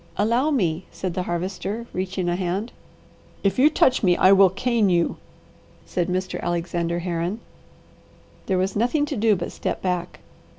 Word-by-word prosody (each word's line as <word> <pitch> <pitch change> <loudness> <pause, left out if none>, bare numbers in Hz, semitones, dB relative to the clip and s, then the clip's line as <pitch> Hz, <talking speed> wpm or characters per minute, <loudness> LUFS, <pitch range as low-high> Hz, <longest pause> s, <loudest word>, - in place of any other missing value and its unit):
"Allow 235 +8 +2
me," 180 - 0
said 185 -2 -4
the 185 - -2
Harvester 190 +5 -3
reaching 185 0 -2
a 175 - +1
hand. 190 +5 -2 0.7
"If 195 +4 +1
you 290 +4 +7
touch 260 -4 +3
me 180 -3 +3
I 185 - +6
will 195 -1 +7
cane 220 +2 +1
you," 175 -1 +1 0.7
said 175 -2 -1
Mr. 185 0 -2
Alexander 170 0 -1
Herron. 175 +3 -2 1.1
There 190 - +1
was 190 +1 0
nothing 245 +7 +1
to 290 - -4
do 220 -2 +3
but 175 -2 -4
step - - -4
back. 180 -2 -2
185 Hz, 160 wpm, -23 LUFS, 175-215 Hz, 1.1 s, you